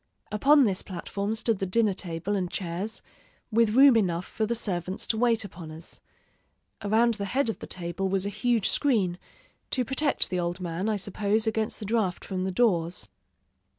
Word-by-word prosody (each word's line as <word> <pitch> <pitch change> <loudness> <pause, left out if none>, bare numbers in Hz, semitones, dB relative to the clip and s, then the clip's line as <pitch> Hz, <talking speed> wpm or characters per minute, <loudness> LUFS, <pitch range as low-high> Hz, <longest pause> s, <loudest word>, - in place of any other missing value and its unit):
Upon 275 +7 +5
this 195 -5 +1
platform 200 +3 -4
stood 220 -2 +1
the 195 - -1
dinner 215 +1 +2
table 180 +2 -3
and 185 -3 -1
chairs, 185 +5 -4 0.5
with 225 0 +3
room 270 -1 +8
enough 180 -5 +1
for 220 - -2
the 235 - 0
servants 185 -4 -1
to - - 0
wait 230 -3 +2
upon 175 -4 -9
us. 160 +2 -10 0.8
Around 225 +3 +3
the 205 -2 -3
head 255 +5 0
of 225 - -3
the - - -8
table 185 +2 -3
was 195 0 0
a - - -1
huge 235 0 +1
screen, 200 -11 +1 0.5
to 255 -2 0
protect 270 +4 +1
the 180 - 0
old 175 +1 -2
man, 180 +3 -2
I 215 - +1
suppose, 205 +2 0
against 220 -1 -1
the 210 - -6
draught 205 -4 -1
from 185 -1 -3
the 190 - -1
doors.... 180 -5 +1
200 Hz, 185 wpm, -27 LUFS, 185-225 Hz, 0.8 s, room